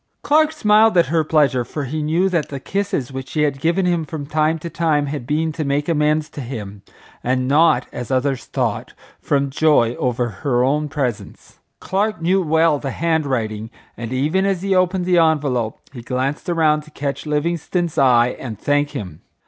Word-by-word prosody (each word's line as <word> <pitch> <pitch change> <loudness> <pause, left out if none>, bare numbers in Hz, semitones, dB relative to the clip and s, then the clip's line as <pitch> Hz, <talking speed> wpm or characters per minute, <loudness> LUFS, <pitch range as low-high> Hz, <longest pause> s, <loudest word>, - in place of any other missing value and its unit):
Clark 310 +1 +3
smiled 215 - +4
at 170 - +5
her 160 -1 +3
pleasure, 145 -5 +2
for 145 +5 -5
he 150 +4 -3
knew 165 +5 +1
that 170 -5 -1
the 140 - -5
kisses 195 -6 -2
which 130 0 -6
she 150 +3 0
had 140 -2 0
given 170 +4 +1
him 175 -2 +1
from 155 -2 -6
time 155 +2 +1
to 160 - -7
time 160 -3 0
had 140 -4 -5
been 160 +2 0
to 155 0 -4
make 145 +1 -1
amends 150 -1 +1
to 145 - -8
him, 105 -6 -7 0.4
and 130 +1 0
not, 145 -2 +4
as 125 - -6
others 130 -1 0
thought, - - -2 0.3
from 140 -1 0
joy 140 -6 +3
over 125 -1 0
her 125 -3 +1
own 150 +3 0
presents. 130 -7 -5 0.2
Clark 210 +2 -1
knew 185 +4 +2
well 160 -2 +2
the 135 - -4
hand 160 +1 0
writing, 110 -4 -2 0.3
and 115 0 -6
even 150 +9 +1
as 195 -2 0
he 195 -1 +1
opened 185 0 +1
the 180 -1 +3
envelope 140 -8 +1
he 125 - -8
glanced 130 +8 -3
around 155 -3 +2
to 150 - -16
catch 140 0 -4
Livingstone's 170 +2 -1
eye 125 -3 +5
and 115 -5 -6
thank 145 +4 +1
him. 90 - -6
150 Hz, 190 wpm, -20 LUFS, 130-165 Hz, 0.4 s, at